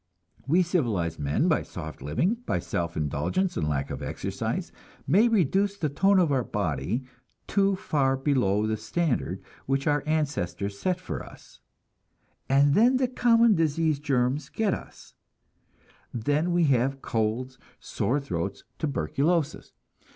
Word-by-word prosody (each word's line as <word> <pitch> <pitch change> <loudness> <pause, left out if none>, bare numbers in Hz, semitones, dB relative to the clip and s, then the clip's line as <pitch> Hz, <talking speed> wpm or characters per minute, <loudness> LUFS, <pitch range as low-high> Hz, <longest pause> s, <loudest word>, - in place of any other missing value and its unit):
We 175 +6 +4
civilized 110 - -1
men, 70 0 +1
by - - +3
soft 80 -3 -8
living, 130 - 0
by - - +1
self 85 -5 -3
indulgence 80 - -1
and 75 - -1
lack 70 -2 -2
of - - -5
exercise, - - -3 0.3
may 200 - +4
reduce 200 - +2
the 155 -6 -1
tone 195 +8 +3
of 175 -5 +3
our 130 -3 +2
body 100 - -2 0.4
too 200 -1 +2
far 135 -7 0
below 125 -7 +1
the 110 0 -1
standard 120 - -1 0.2
which 135 +1 0
our 145 -2 +2
ancestors 100 - -1
set 185 -1 0
for 185 - -5
us; - - -15 0.9
and 140 +1 +4
then 245 - +5
the 255 -1 +2
common 235 -2 +4
disease 160 -3 +1
germs 135 0 0
get 215 -4 0
us, - - -9 1.0
then 145 +9 0
we 175 0 +3
have 135 -1 +1
colds, 115 +4 -2 0.2
sore 140 +5 -1
throats, 95 -8 -4 0.2
tuberculosis. 145 - -1
140 Hz, 135 wpm, -27 LUFS, 110-175 Hz, 1.0 s, then